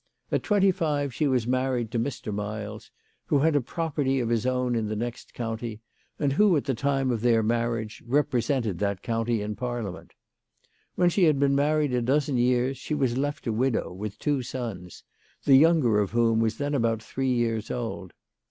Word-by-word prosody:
At - - +1
twenty 195 -2 +3
five 145 -6 -1
she 150 +4 0
was 125 -4 +1
married 125 -2 0
to 115 - -1
Mr. 115 -3 -3
Miles, 105 +1 -5 0.4
who - - +3
had 155 +2 +3
a 145 - +3
property 140 -1 -1
of 120 -2 -1
his 120 +1 +1
own 125 -1 0
in 115 -2 0
the 110 - -3
next 120 +2 -5
county, 115 -1 -4 0.4
and 140 -2 0
who 190 +1 +4
at 140 - -1
the 135 - 0
time 135 +1 0
of 115 -3 -1
their 115 -2 +3
marriage 115 -1 -1
represented 120 -6 0
that 100 -2 -1
county 115 -1 -1
in 105 0 -4
Parliament. 120 -4 -5 0.8
When 175 -1 +3
she 185 0 +3
had 155 -3 +4
been 140 0 +2
married 145 0 +2
a 125 - +1
dozen 135 +2 +1
years 125 +2 +1
she 150 - -3
was 130 -5 0
left 145 +2 -2
a 115 - 0
widow, 120 -3 0
with 105 +2 -6
two 145 +1 0
sons, 115 -9 -6 0.4
the 135 - +7
younger 140 -7 +5
of 100 -2 0
whom 115 -1 +2
was 115 -1 0
then 145 +1 -2
about 115 -4 0
three 130 +3 -2
years 115 -3 0
old. 115 -7 -4
125 Hz, 190 wpm, -26 LUFS, 115-140 Hz, 0.8 s, the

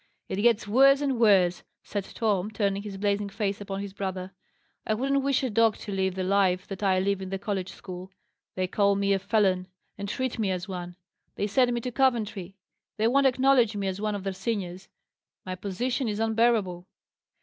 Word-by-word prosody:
"It 190 - -3
gets 220 0 +3
worse 275 +5 +6
and 270 -4 0
worse," 190 -6 +4 0.2
said 200 -2 -4
Tom, 210 -3 0
turning 200 -2 -1
his 200 -2 -7
blazing 200 0 0
face 200 -1 -2
upon 195 -1 -4
his 200 -1 -6
brother. 190 -1 -4 0.5
"I 215 - 0
wouldn't 275 +4 +1
wish 275 0 +1
a 260 - 0
dog 225 0 +3
to 205 - -7
live 190 -1 0
the 190 - -2
life 185 -1 +2
that 195 -1 -6
I 190 -2 +3
live 195 +1 0
in 190 - -5
the 195 - -2
college 195 -2 -3
school. 185 0 -9 0.5
They 185 - 0
call 200 +2 +2
me 200 0 +2
a 195 - +1
felon, 195 -2 +1 0.3
and 200 0 -4
treat 260 +2 -2
me 210 -3 +1
as 180 -1 -2
one; 175 -2 -6 0.4
they 205 - -1
send 245 +4 +3
me 240 0 -1
to 250 - -4
Coventry; 220 -7 0 0.4
they 220 +1 +2
won't 275 +3 +4
acknowledge 255 -4 +3
me 200 -1 -2
as 190 +1 -3
one 215 -1 -1
of 200 - -5
their 195 -1 -2
seniors. 190 -2 -4 0.6
My 185 - -4
position 230 +8 -2
is 210 -1 -2
unbearable." 220 -5 +1
200 Hz, 200 wpm, -27 LUFS, 190-230 Hz, 0.6 s, worse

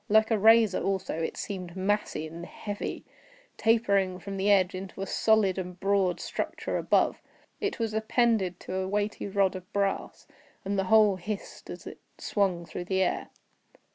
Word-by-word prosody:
Like 220 +2 +4
a 220 - +3
razor 220 -1 +5
also, 190 -4 -1
it 160 - -3
seemed 185 -3 -5
massy 195 -4 -1
and 165 +2 -8
heavy, 205 +3 -5 0.5
tapering 200 -5 +2
from 195 +2 -7
the 195 +2 +1
edge 190 -3 +4
into 190 +1 -6
a - - -2
solid 205 -3 +2
and 180 -1 -6
broad 195 -2 +1
structure - - -3
above. - - +2 0.4
It 410 -1 -2
was 225 -2 -2
appended 220 -4 +1
to - - -6
a 190 0 -1
weighty 205 +1 -1
rod 195 -1 +1
of 185 -1 -9
brass, 200 -1 -1 0.4
and 200 0 0
the 195 - +1
whole 210 -1 +5
hissed 200 +3 -6
as - - -8
it - - -9 0.2
swung 185 -4 0
through 175 - -6
the 190 +1 +1
air. - - -1
195 Hz, 170 wpm, -28 LUFS, 185-210 Hz, 0.5 s, razor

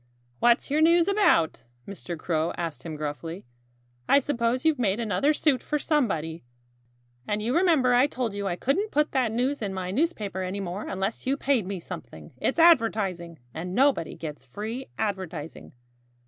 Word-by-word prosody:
"What's 240 +3 +3
your 300 +2 +2
news 335 +1 +5
about?" 390 - +3 0.3
Mr. 180 -3 -6
Crow 160 0 -1
asked 165 -3 -4
him 160 -2 -6
gruffly. 155 +3 -5 0.6
"I - - +7
suppose 255 -2 0
you've 315 -4 +3
made 210 -2 +1
another 235 +6 +1
suit 295 -3 +2
for 300 - -1
somebody. 170 - -1 0.8
And 210 - 0
you 230 +4 -1
remember 325 -8 +4
I 250 +3 +5
told 245 -6 -3
you 200 0 -3
I 175 - -1
couldn't 355 - 0
put 300 -2 +1
that 255 -5 +1
news 255 +5 -1
in 195 -3 -3
my 185 -1 -3
newspaper 210 - -1
any 185 +2 -3
more 190 +1 -4
unless 195 +6 -3
you 275 +2 +1
paid 260 -9 +1
me 195 -2 -4
something. - - -9
It's - - -1
advertising. 215 - +3 0.2
And 180 +3 -5
nobody 270 - +2
gets 150 -4 -7
free 220 - -6
advertising." 185 -7 -4
220 Hz, 165 wpm, -26 LUFS, 180-275 Hz, 0.8 s, I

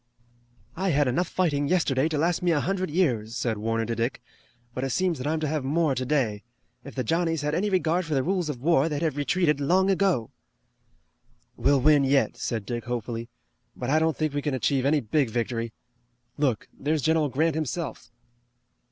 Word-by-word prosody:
"I 190 +2 -1
had 145 -3 +2
enough 135 +9 +1
fighting 145 -6 0
yesterday 155 -5 +2
to 155 - -1
last 165 +3 +1
me 180 - +1
a 160 -3 +3
hundred 185 +3 -1
years," 125 - 0
said 110 -4 -1
Warner 115 +1 -1
to 115 +1 -2
Dick, 115 +3 -1 0.5
"but 130 - -3
it 135 - -1
seems 180 +3 0
that 130 - -3
I'm 160 +1 0
to 155 - 0
have 150 -1 -1
more 150 +2 +1
today. 130 -5 0 0.4
If 140 - -10
the 130 - -1
Johnnies 165 +3 0
had 150 0 -1
any 200 +6 +1
regard 180 -2 +1
for 155 - -1
the 135 - +2
rules 180 -1 0
of 135 -5 -4
war 160 -1 +3
they'd 150 +1 -2
have 155 -4 0
retreated 150 +1 +1
long 185 +7 +3
ago." 185 - +1 1.2
"We'll 140 -1 +2
win 150 0 +5
yet," 135 0 +2
said 115 -4 -3
Dick 120 +1 -4
hopefully, 115 -1 -4 0.5
"but 125 +1 -3
I 155 - +4
don't 160 -1 +1
think 155 -2 -1
we 145 - -1
can 145 -2 -1
achieve 130 0 0
any 150 0 +3
big 130 +3 +1
victory. 115 0 -2 0.6
Look, 135 -7 0
there's 150 0 -1
General 160 -2 +2
Grant 155 +5 +1
himself." 155 -1 -4
145 Hz, 195 wpm, -26 LUFS, 130-165 Hz, 1.2 s, win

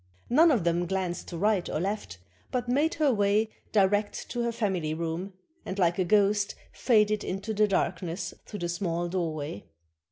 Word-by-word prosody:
None 320 +7 +6
of 245 - +2
them 175 +1 +1
glanced 185 -1 -2
to 170 - -6
right 205 0 +1
or - - -1
left, 190 - -3 0.3
but 245 -1 -2
made 290 +6 +2
her 290 -3 +3
way 205 +1 +2 0.2
direct 205 0 +1
to 240 - -1
her 235 0 0
family 185 -9 -1
room, 170 +4 -3 0.3
and 190 - -5
like 175 -1 +2
a - - +4
ghost 205 +1 +3 0.2
faded 215 -3 +2
into 195 +4 -3
the 210 0 +3
dark 185 -3 0
ness 170 0 -4
through 205 - -7
the 175 - -1
small 175 -1 -1
doorway. 155 - -3
195 Hz, 180 wpm, -28 LUFS, 175-215 Hz, 0.3 s, None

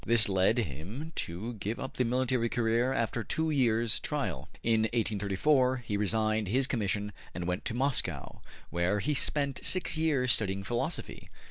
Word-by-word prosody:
'' - - -13
This 115 -2 +5
led 95 +3 +2
him 105 - -4
to 95 +9 -4
give 105 +4 -3
up 135 - -6
the 125 - +3
military 125 -1 +1
career 120 +2 +1
after 115 -2 -1
two 160 +7 -1
years' 115 -5 +2
trial. - - -3
In 115 -1 +3
1834 120 +5 +2
he 105 - -2
resigned 110 +1 +1
his 130 +7 +2
commission 105 -4 -1 0.2
and 85 0 -3
went 90 +1 -2
to 115 - -3
Moscow, 120 - 0 0.3
where 85 +4 +1
he 150 +8 0
spent 140 -1 +1
six 185 -3 +1
years 140 -6 +2
studying 100 -1 +1
philosophy. 120 +4 -3
115 Hz, 160 wpm, -30 LUFS, 100-130 Hz, 0.3 s, This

